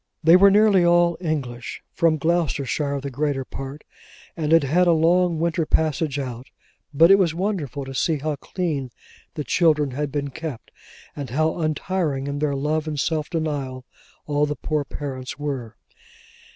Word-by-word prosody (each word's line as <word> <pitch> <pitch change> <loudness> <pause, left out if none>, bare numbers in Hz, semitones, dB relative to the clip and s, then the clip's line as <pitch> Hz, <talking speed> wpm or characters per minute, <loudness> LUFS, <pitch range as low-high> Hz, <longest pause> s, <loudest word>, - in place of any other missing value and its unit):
They 165 +2 +7
were 200 +2 +7
nearly 205 -2 +5
all 175 0 +4
English; 135 -8 -4
from 165 -2 +2
Gloucestershire 150 -3 0
the 140 0 -5
greater 140 0 -1
part; 135 +3 -8 0.5
and 155 -2 -2
had 165 -2 +6
had 175 +6 +2
a 170 - +5
long 170 +1 +3
winter 165 0 0
passage 155 -2 +1
out; 125 -2 -5 0.4
but 165 +5 +6
it 195 - +7
was 170 -4 +2
wonderful 170 - -3
to 135 - -7
see 155 +4 +1
how 150 +1 -2
clean 150 -6 -3 0.5
the 150 - -3
children 150 -4 +2
had 145 +2 -3
been 140 0 -3
kept, 150 -3 -7 0.4
and 140 -4 -6
how 155 +5 +1
untiring 155 -2 -1
in 140 0 -3
their 145 -2 0
love 150 +3 -1
and 150 -2 -3
self 155 +1 -1
denial 140 -6 -3 0.4
all 150 0 +1
the 150 - -2
poor 150 -1 -2
parents 135 -2 -6
were. 135 -6 -5
150 Hz, 165 wpm, -23 LUFS, 140-165 Hz, 0.5 s, They